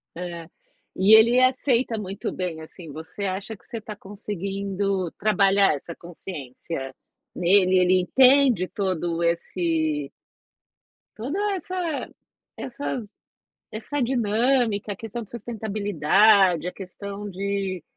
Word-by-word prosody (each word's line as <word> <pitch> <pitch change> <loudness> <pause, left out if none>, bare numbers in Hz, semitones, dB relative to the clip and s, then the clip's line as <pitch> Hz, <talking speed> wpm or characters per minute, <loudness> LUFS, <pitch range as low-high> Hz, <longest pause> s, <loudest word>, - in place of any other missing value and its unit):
É, 170 -1 -7 0.5
e 200 +4 +7
ele 235 +3 +6
aceita 255 -2 +2
muito 200 -1 -4
bem 175 -4 -4
assim. 160 0 -11
Você 160 +7 -8
acha 195 +3 -3
que - - -24
você 230 - -6
tá 215 -1 -8
conseguindo 195 -1 -3
trabalhar 200 -3 +3
essa 165 +4 -8
consciência 150 -5 -7 0.4
nele? 185 +1 +4
Ele 185 0 +4
entende 255 -1 +5
todo 175 -4 -2
esse 165 -3 -1 1.0
Toda 265 - -4 0.2
essa 355 -4 -3 0.5
essas 250 -3 -5 0.6
essa 270 +7 -4
dinâmica, 235 -2 +1
a - - -12
questão 225 +3 -6
de 210 - -16
sustentabilidade, 205 -5 +2
a - - -2
questão 200 +2 -7
de 195 -2 -3
200 Hz, 110 wpm, -24 LUFS, 180-220 Hz, 1.0 s, e